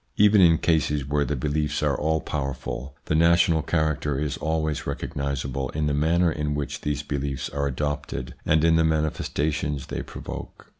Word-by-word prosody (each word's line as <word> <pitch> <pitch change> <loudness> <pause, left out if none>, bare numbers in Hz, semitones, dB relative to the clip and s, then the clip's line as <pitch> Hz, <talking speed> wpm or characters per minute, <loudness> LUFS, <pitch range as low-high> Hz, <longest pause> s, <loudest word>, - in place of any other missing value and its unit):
Even 105 -1 +6
in 85 -2 +6
cases 75 -4 +1
where 70 +1 +1
the 75 - -1
beliefs 75 +2 -1
are 70 -2 +2
all 80 +3 0
powerful 70 -1 -4
the - - -1
national 85 0 +4
character 75 -3 0
is 75 -2 -1
always 80 -1 -1
recognisable 70 -2 -3
in 75 0 0
the 75 - +1
manner 85 +4 +3
in 75 -1 -2
which 75 -1 -4
these 75 0 -2
beliefs 70 -2 -3
are 70 0 -1
adopted 70 -3 -3
and 75 0 +3
in 80 0 +5
the 80 - +4
manifestations 75 -2 -1
they - - -4
provoke. - - -8
75 Hz, 165 wpm, -25 LUFS, 70-80 Hz, -, Even